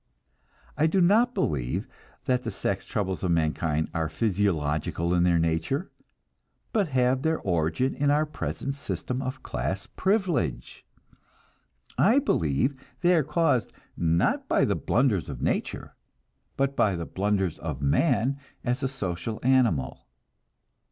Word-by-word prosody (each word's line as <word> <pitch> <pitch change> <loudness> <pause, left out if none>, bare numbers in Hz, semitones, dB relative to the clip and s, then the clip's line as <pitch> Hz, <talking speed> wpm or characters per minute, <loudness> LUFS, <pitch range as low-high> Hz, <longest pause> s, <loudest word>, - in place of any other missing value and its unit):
I 150 +4 +3
do 190 +4 +2
not 225 +8 +4
believe 65 -6 -1 0.4
that 125 -3 +1
the 120 - -4
sex - - -3
troubles 95 -3 -2
of 90 - -1
mankind 80 -1 0
are 80 -1 -1
physiological 85 -5 0
in 90 - +3
their 85 -1 +4
nature, 85 - -1 0.8
but 205 -5 +2
have 130 -2 +2
their 160 +2 +1
origin 85 +8 0
in 145 0 0
our 150 +2 +3
present 140 -2 -4
system 130 -2 -4
of 130 0 -5
class 85 - -3
privilege. 170 - -1 1.2
I 225 +7 +5
believe 130 - +1 0.3
they 180 0 +4
are 165 - +4
caused, 150 -5 +1 0.2
not 85 0 +1
by - - +3
the - - +1
blunders 115 - +1
of - - -6
nature, - - -2 0.6
but 140 0 +1
by 100 -7 +2
the 85 -1 -4
blunders 95 -3 -1
of 75 -5 -4
man 130 - +2 0.2
as 125 +2 -1
a 135 - +1
social 110 -4 -4
animal. 110 - +2
115 Hz, 135 wpm, -27 LUFS, 85-140 Hz, 1.2 s, I